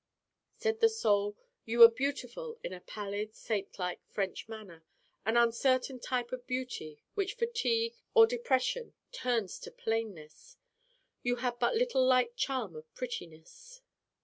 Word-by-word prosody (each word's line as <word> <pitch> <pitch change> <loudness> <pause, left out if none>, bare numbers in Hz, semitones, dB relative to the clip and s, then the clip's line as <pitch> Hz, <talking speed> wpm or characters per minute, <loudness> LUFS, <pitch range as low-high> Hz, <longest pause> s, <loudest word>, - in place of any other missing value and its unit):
Said 445 -1 0
the 455 -1 +6
Soul: 205 - +1 0.3
'You 230 +1 -3
were 230 -1 +13
beautiful 285 - -3
in - - -4
a 180 - -7
pallid 210 +2 -5
saintlike 195 -4 -3
French 195 +2 -3
manner 200 -7 -10 0.4
an 225 +2 +3
uncertain 255 +2 +3
type 245 -1 -2
of 250 -1 -6
beauty 250 - -4
which 400 +1 -1
fatigue 465 -1 0 0.2
or 455 -1 +10
depression 465 - 0 0.2
turns 240 - -1
to - - -8
plainness. 225 - -4 0.6
You 245 0 +1
had 245 0 -2
but 240 - +2
little 475 - +3
light 255 - +3
charm 255 - -1
of 155 0 -11
prettiness. 250 - -8
245 Hz, 135 wpm, -32 LUFS, -, 0.6 s, were